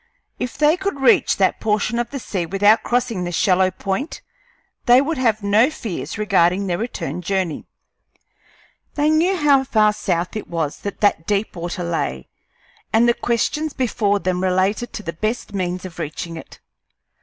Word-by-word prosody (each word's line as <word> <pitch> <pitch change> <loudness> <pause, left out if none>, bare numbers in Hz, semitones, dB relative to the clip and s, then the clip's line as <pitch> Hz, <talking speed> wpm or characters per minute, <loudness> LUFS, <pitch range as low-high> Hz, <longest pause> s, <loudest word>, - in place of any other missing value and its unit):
If 250 +2 -4
they 305 +3 +4
could 385 -6 -3
reach 270 - +4
that 190 -1 +2
portion 215 +2 0
of 240 - -2
the 280 - -5
sea 190 -9 -3
without 205 +4 +4
crossing 240 -6 -1
the 175 - -3
shallow 185 +1 +3
point, 195 - -4 0.6
they 245 +1 +7
would 290 +2 -1
have 220 -4 +1
no 210 +6 +4
fears 220 - -5
regarding 195 -2 +2
their 175 -1 -1
return 225 -5 -4
voyage. 185 -4 -2 1.3
They 295 +1 +2
knew 345 +5 +2
how 285 -4 +4
far 215 -5 +3
south 175 -2 -2
it 215 - -5
was 160 -4 -3
that 200 - -6
that 200 -6 +2
deep 205 0 -1
water 175 +1 -4
lay, 65 - -3 0.6
and 230 +2 +4
the 235 - +5
questions 275 +7 -1
before 220 -5 0
them 185 -2 -1
related 190 +5 0
to 210 - -6
the 170 -2 -4
best 215 +4 -3
means 185 -1 -3
of 175 -2 -9
reaching 165 +1 -5
it. 160 - -11
205 Hz, 165 wpm, -21 LUFS, 180-245 Hz, 1.3 s, they